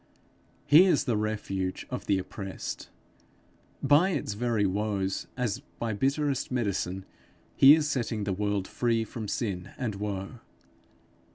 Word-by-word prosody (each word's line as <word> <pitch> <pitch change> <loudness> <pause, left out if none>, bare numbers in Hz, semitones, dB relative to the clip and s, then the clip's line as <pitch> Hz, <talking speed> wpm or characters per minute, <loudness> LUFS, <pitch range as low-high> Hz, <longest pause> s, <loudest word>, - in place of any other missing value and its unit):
He 160 +6 +8
is 175 -6 +3
the 125 -5 0
refuge 105 -3 -2
of - - -5
the 100 - +3
oppressed. 95 +1 -6 0.9
By 155 +6 +5
its 145 - -2
very 115 -1 0
woes, 100 -1 -1
as 125 -2 -1 0.2
by 115 -2 -2
bitterest 140 +4 0
medicine, 95 -6 -2 0.5
he 140 +2 +9
is 155 -2 0
setting 120 -6 -1
the 100 -1 -1
world 100 -1 -1
free 115 -2 0
from 110 -1 -6
sin 100 -4 -3
and 125 -6 -2
woe. 100 +2 -5
110 Hz, 130 wpm, -28 LUFS, 100-125 Hz, 0.9 s, he